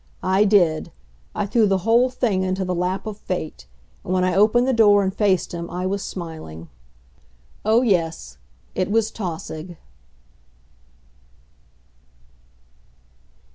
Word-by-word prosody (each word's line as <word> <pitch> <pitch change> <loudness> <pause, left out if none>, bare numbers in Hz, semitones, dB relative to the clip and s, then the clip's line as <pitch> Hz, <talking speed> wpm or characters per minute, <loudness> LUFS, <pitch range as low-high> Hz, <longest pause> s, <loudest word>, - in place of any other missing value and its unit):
I 190 +3 +3
did. 175 -7 +2 0.4
I - - -1
threw 215 +1 +2
the 195 -1 +2
whole 235 +3 +4
thing 235 -7 0
into 190 0 -1
the 180 - -1
lap 180 +2 -2
of 215 -1 -6
Fate. 155 - -5 0.4
And - - -5
when 185 0 +2
I 185 0 +1
opened 215 +6 +4
the 265 - +2
door 205 -3 +5
and 190 0 -1
faced 195 -3 +1
him 170 0 -5
I 180 +1 -4
was 195 +1 -1
smiling. 160 - -8 0.9
Oh, 220 +3 +3
yes, 165 - -1 0.3
it 185 0 -1
was 220 +1 +1
Tausig. 170 -3 -6
190 Hz, 130 wpm, -22 LUFS, 175-210 Hz, 0.9 s, door